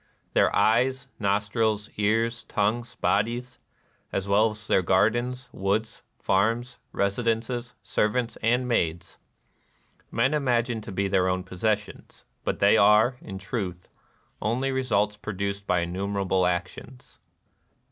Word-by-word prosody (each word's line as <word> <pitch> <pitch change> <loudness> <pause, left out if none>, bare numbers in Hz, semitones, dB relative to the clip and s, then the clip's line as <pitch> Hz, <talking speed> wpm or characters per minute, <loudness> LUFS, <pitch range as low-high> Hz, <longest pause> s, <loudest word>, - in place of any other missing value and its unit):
Their - - +4
eyes, 130 +4 +2
nostrUs, 105 +1 0
ears, 115 +3 +1
tongues, 115 +4 -1
bodies, 120 +5 -1 0.3
— - - -40
as 95 0 -2
well 105 +3 +4
as 105 0 -9
their 95 - +3
gardens, 120 +8 +1
woods, 105 +3 -1 0.2
farms, 115 +5 0
residences, 115 +4 -1
servants, 115 +3 0
and 125 +3 +2
maids, 85 -7 -1 0.5
— - - -39
men 125 +5 +2
imagine 120 -5 +1
to 110 0 -8
be 100 +1 0
their 95 -1 +2
own 90 0 -1
possessions; 105 +3 -3 0.2
but - - -1
they 100 +2 +5
are, 105 +4 +5
in 95 -2 -7
truth, 95 -3 -5 0.5
only 125 +5 0
results 105 -6 0
produced 100 -1 -4
by 90 -1 +2
innumerable 95 +1 0
actions." 95 +8 -5
105 Hz, 125 wpm, -26 LUFS, 100-120 Hz, 0.5 s, they